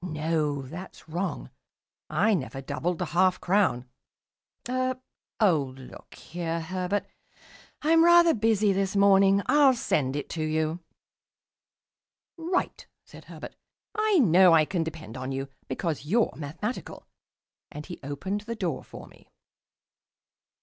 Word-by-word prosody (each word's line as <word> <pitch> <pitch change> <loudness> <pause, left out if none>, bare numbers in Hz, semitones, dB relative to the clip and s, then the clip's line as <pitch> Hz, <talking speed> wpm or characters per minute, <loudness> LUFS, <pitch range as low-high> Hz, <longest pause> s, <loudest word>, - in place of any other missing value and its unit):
No, 155 -4 -1
that's 165 +8 -10
wrong 175 +5 -4 0.6
I 220 +1 +2
never 135 -6 -3
doubled 150 +6 -3
the - - -2
half 180 +2 +2
crown. 180 -10 +1 0.8
Er 255 0 -1 0.4
oh, 155 - +2
look 130 - -13
here, 170 0 -4
Herbert, 185 +4 -2 0.8
I'm 325 +2 +5
rather 345 -1 +6
busy 215 -2 +2
this 195 +1 -1
morning. 195 0 +5
I'll 285 -3 +5
send 140 - -1
it 145 - -4
to 160 - -4
you." 155 +1 -1 1.6
"Right," 350 +2 -2 0.2
said - - -14
Herbert. - - -10 0.4
"I 430 -2 +2
know 185 - +6
I 155 -2 +5
can 175 0 -1
depend 160 -7 -8
on 130 +1 -5
you, 135 +1 -4 0.2
because 150 +2 -3
you're 215 +10 +1
mathematical." 165 - -6 0.7
And 150 0 -8
he 175 - -9
opened 160 +9 -4
the 230 +2 -6
door 180 - -3
for - - -11
me. - - -20
180 Hz, 130 wpm, -27 LUFS, 155-210 Hz, 1.6 s, rather